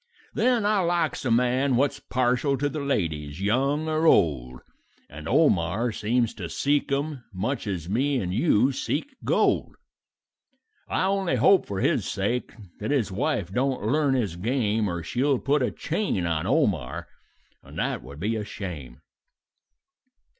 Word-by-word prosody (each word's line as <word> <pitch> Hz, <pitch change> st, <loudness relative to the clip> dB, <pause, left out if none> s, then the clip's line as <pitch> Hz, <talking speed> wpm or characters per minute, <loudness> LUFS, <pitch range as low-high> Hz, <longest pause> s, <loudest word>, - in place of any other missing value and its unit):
"Then 235 Hz, -1 st, +2 dB
I 210 Hz, -1 st, +3 dB
likes 170 Hz, -5 st, 0 dB
a -, -, +1 dB
man 125 Hz, +3 st, +2 dB
what's 140 Hz, +3 st, +1 dB
partial 130 Hz, +1 st, 0 dB
to 145 Hz, +3 st, 0 dB
the 150 Hz, +2 st, -4 dB
ladies, 80 Hz, -, -2 dB
young 135 Hz, +9 st, +1 dB
or 155 Hz, +1 st, +1 dB
old, 65 Hz, -, +2 dB, 0.5 s
And 75 Hz, +2 st, -8 dB
Omar 115 Hz, -, +2 dB
seems 115 Hz, +2 st, 0 dB
to -, -, -6 dB
seek 145 Hz, 0 st, 0 dB
'em 140 Hz, -1 st, -2 dB
much 110 Hz, +6 st, -3 dB
as 90 Hz, -5 st, -3 dB
me 135 Hz, +8 st, +1 dB
and 90 Hz, -4 st, -3 dB
you 130 Hz, -, +3 dB
seek 150 Hz, -, -3 dB
gold; -, -, +1 dB, 1.1 s
I -, -, 0 dB
only 190 Hz, -6 st, +1 dB
hope 165 Hz, -, +4 dB
for 95 Hz, -1 st, -3 dB
his -, -, +2 dB
sake 120 Hz, +6 st, -2 dB, 0.3 s
that -, -, -4 dB
his 135 Hz, -9 st, +1 dB
wife 100 Hz, -, -1 dB
don't 130 Hz, -1 st, 0 dB
learn 140 Hz, +3 st, +2 dB
his 105 Hz, -9 st, -1 dB
game 110 Hz, 0 st, 0 dB
Or 85 Hz, -1 st, -4 dB
she'll 130 Hz, -, +1 dB
put 145 Hz, +4 st, +1 dB
a -, -, +1 dB
chain 160 Hz, -, -2 dB
on 85 Hz, +1 st, -1 dB
Omar, 105 Hz, -, 0 dB, 0.5 s
and -, -, -13 dB
that -, -, -1 dB
would 70 Hz, -, -11 dB
be 110 Hz, +6 st, -1 dB
a 110 Hz, -, -2 dB
shame. 90 Hz, -10 st, -7 dB
125 Hz, 155 wpm, -25 LUFS, 95-145 Hz, 1.1 s, hope